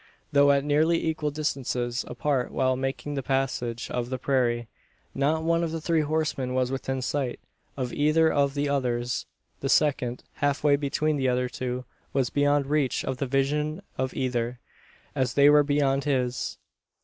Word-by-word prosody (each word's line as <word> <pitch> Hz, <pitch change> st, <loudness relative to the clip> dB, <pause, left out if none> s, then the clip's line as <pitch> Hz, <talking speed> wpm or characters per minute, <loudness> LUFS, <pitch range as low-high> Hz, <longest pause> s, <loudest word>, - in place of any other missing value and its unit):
Though 140 Hz, 0 st, +5 dB
at 140 Hz, -1 st, +2 dB
nearly 155 Hz, +3 st, +2 dB
equal 155 Hz, -2 st, -1 dB
distances 130 Hz, -4 st, -2 dB
apart 140 Hz, -4 st, -1 dB
while 130 Hz, -1 st, +1 dB
making 135 Hz, +2 st, -3 dB
the 140 Hz, -, -2 dB
passage 125 Hz, -3 st, -1 dB
of 120 Hz, -1 st, -2 dB
the 130 Hz, -, -2 dB
prairie, 120 Hz, -3 st, 0 dB, 0.5 s
not 150 Hz, +4 st, +1 dB
one 170 Hz, +1 st, +2 dB
of 165 Hz, -, -1 dB
the 165 Hz, -, -3 dB
three 165 Hz, 0 st, +1 dB
horsemen 150 Hz, -4 st, -1 dB
was 130 Hz, 0 st, +1 dB
within 135 Hz, -1 st, -2 dB
sight 130 Hz, -1 st, -2 dB, 0.4 s
of 125 Hz, -2 st, -3 dB
either 155 Hz, +2 st, +3 dB
of 140 Hz, -1 st, +2 dB
the 145 Hz, 0 st, 0 dB
others. 125 Hz, -3 st, -1 dB, 0.3 s
The 135 Hz, -, -2 dB
second, 130 Hz, -5 st, +2 dB
half 145 Hz, -1 st, 0 dB
way 145 Hz, -1 st, +5 dB
between 150 Hz, +1 st, 0 dB
the 130 Hz, -2 st, +1 dB
other 125 Hz, 0 st, +1 dB
two, 125 Hz, 0 st, -4 dB, 0.3 s
was 135 Hz, -3 st, +1 dB
beyond 145 Hz, 0 st, +2 dB
reach 145 Hz, -2 st, 0 dB
of 130 Hz, -, -2 dB
the 140 Hz, -, -2 dB
vision 150 Hz, +6 st, 0 dB
of 130 Hz, 0 st, -2 dB
either, 125 Hz, -2 st, -1 dB, 0.5 s
as 130 Hz, -2 st, -1 dB
they 145 Hz, +1 st, +7 dB
were 150 Hz, 0 st, +7 dB
beyond 140 Hz, -1 st, +1 dB
his. 125 Hz, -3 st, -1 dB
135 Hz, 170 wpm, -26 LUFS, 125-150 Hz, 0.5 s, they